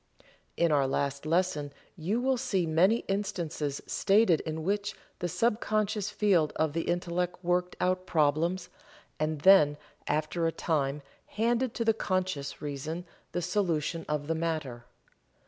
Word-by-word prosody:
In 170 -1 +3
our 140 -2 +3
last 140 +2 -2
lesson 165 -4 +1 0.2
you 190 +7 -1
will 260 +1 +2
see 225 -8 0
many 180 +8 +3
instances 175 -8 -2
stated 195 -4 +3
in 160 0 -4
which 205 +3 -1 0.2
the 175 - -1
sub 230 +5 +1
conscious 210 -1 0
field 195 -7 +2
of 155 -2 0
the 165 0 -1
Intellect 175 0 -1
worked 180 +1 0
out 185 0 0
problems, 165 +4 +1 0.5
and 155 -1 -1
then 150 -5 +6 0.3
after 155 +3 0
a - - +1
time 145 -4 -1 0.2
handed 235 +3 0
to 230 - -1
the 225 - +4
conscious 185 -10 -2
reason 150 +4 -4 0.3
the 175 - -1
solution 170 -3 0
of 150 -1 -1
the 165 - 0
matter. 155 -8 -3
170 Hz, 145 wpm, -29 LUFS, 155-195 Hz, 0.5 s, then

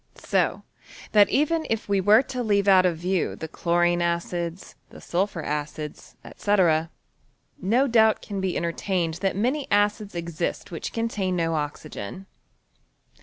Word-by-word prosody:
So - - 0 0.5
that 205 -1 +6
even 315 +3 +1
if 225 -1 -2
we 200 -1 +2
were 210 +6 +6
to 255 -1 -4
leave 205 -3 +1
out 185 -2 +6
of 170 -2 -1
view 180 +1 -1
the 160 - -6
chlorine 175 +1 +1
acids, 170 0 -3 0.2
the - - -13
sulphur 180 -2 -2
acids, 150 0 -5 0.2
&c., 205 0 +2 1.1
no 245 +8 +2
doubt 220 -3 +4
can 200 -3 -4
be 190 -2 -1
entertained 170 0 -1
that 195 -1 0
many 260 +8 0
acids 205 -1 +1
exist 170 0 -4
which 165 - -5
con 230 0 -1
tain 190 -5 -2
no 165 -1 0
oxygen. 150 - -5
190 Hz, 145 wpm, -25 LUFS, 170-210 Hz, 1.1 s, that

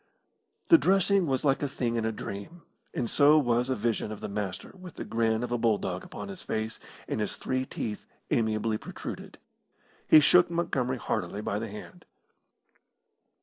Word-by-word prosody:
The 330 - +9
dressing 195 -1 +3
was 135 0 0
like 135 -1 +2
a 145 - 0
thing 120 -3 -2
in 115 -1 0
a 110 - +1
dream, 110 - -7 0.3
and 120 - -2
so 145 +5 +5
was 120 -3 +2
a 130 - +1
vision 115 -1 -1
of 110 - -6
the - - -5
Master 100 -2 -4
with 185 -3 -11
the - - -6
grin 115 0 0
of 120 - -4
a 120 - 0
bulldog 105 -5 0
upon 105 - -8
his 100 - -7
face, 110 +1 -3 0.3
and - - -2
his 105 - -1
three 130 0 -2
teeth 105 -2 -5 0.2
amiably 110 -1 +1
protruded. - - -8 0.7
He 155 - +9
shook 175 +4 +5
Montgomery 135 -7 -1
heartily 100 -3 -3
by 105 -1 -2
the 110 0 -4
hand. 100 -4 -11
115 Hz, 175 wpm, -28 LUFS, 105-140 Hz, 0.7 s, The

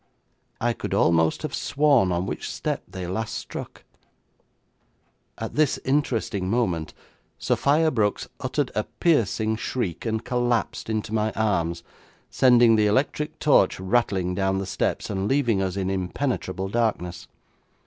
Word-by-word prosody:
I 120 0 +1
could - - -4
almost 80 - +2
have 155 -3 -4
sworn 140 -10 +2
on 85 +1 0
which - - -4
step - - -3
they 95 -1 -6
last 105 +5 -3
struck. - - -7 1.5
At - - -5
this 150 -3 +2
interesting 115 -8 0
moment 90 -9 -1 0.4
Sophia 155 +3 +2
Brooks 105 -5 0
uttered - - -1
a - - -1
piercing 110 - +1
shriek 110 -7 -3
and 110 0 -2
collapsed 120 -2 -1
into 110 -1 -2
my 110 0 +1
arms, 85 -6 0 0.5
sending 120 -3 +5
the 105 -1 +3
electric 145 +7 0
torch 135 -13 +3
rattling 95 -2 +1
down 95 0 0
the 95 - -2
steps, 95 0 -1
and 95 0 -1
leaving 120 -7 +2
us 95 0 -2
in 95 -1 -1
impenetrable 95 0 -2
darkness. 95 -6 -1
110 Hz, 135 wpm, -24 LUFS, 95-125 Hz, 1.5 s, sending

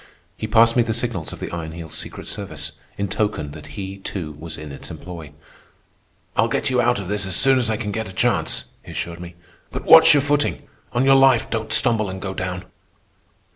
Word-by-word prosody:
He 110 - -5
passed 115 +1 +5
me 120 - +5
the 115 -2 0
signals 115 -9 -2
of - - -9
the - - -5
Iron 80 -2 -5
Heel's 85 -1 -8
secret - - -4
service, - - -4 0.3
in 100 - -1
token 100 -7 -2
that 75 0 -11
he, 95 0 -5
too, 90 -5 -5
was 80 +2 -8
in 75 -1 -8
its 70 - -8
employ. 85 -5 -9 1.0
"I'll 115 - +3
get 130 +4 -1
you 125 -1 +3
out 120 -1 +2
of 95 - -6
this 100 0 0
as 95 - +1
soon 135 +2 +5
as 120 -3 +1
I 110 - 0
can 105 -2 -4
get 110 +1 -3
a - - -9
chance," 95 - 0 0.2
he - - -11
assured 85 0 -4
me. 90 0 -9 0.4
"But - - -6
watch 160 -1 +9
your 145 - +4
footing. 145 +1 0 0.3
On 125 +2 +2
your 135 - +6
life 135 -3 +4
don't 110 -1 -3
stumble 110 -5 +3
and 95 0 -6
go 95 0 -4
down." 90 -1 -4
105 Hz, 215 wpm, -22 LUFS, 85-120 Hz, 1.0 s, watch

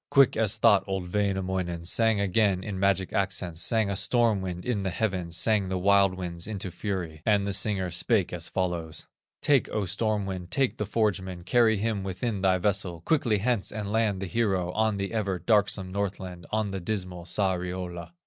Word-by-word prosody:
Quick 140 -3 +5
as 110 -3 +2
thought 105 -4 +5
old 95 -2 -4
Wainamoinen 95 -4 -1
Sang 110 +3 +2
again 100 -1 +2
in 100 -3 -4
magic 95 -1 +1
accents, 90 -3 -1
Sang 110 -3 +1
a 100 - -1
storm 115 -1 +2
wind 90 -1 -5
in 120 -5 0
the 95 - -1
heavens, 90 -3 -1
Sang 105 -4 +2
the 95 - -1
wild 100 0 +4
winds 90 -1 -5
into 100 -4 -4
fury, 90 -4 -4
And 105 -1 +2
the 100 - -1
singer 95 -3 +1
spake - - +1
as - - -3
follows: 85 -4 -2 0.4
"Take, 140 -3 +3
O 105 -2 -1
storm 105 +1 0
wind, 90 -2 -5
take 135 +2 0
the 105 - -3
forgeman, 95 -5 -1
Carry 115 -2 +4
him 110 0 -1
within 95 +2 -3
thy 95 -1 +3
vessel, 95 -3 -1
Quickly 120 - +2
hence, 115 0 0
and 105 -1 -4
land 110 -3 +1
the - - -2
hero 95 -4 0
On 110 +1 +1
the 100 +2 -3
ever 100 -4 -1
darksome 100 -1 +1
Northland, 95 -3 -4
On 110 -2 0
the 95 - -3
dismal 90 -2 -4
Sariola." 90 - -2
95 Hz, 185 wpm, -27 LUFS, 90-105 Hz, 0.4 s, Quick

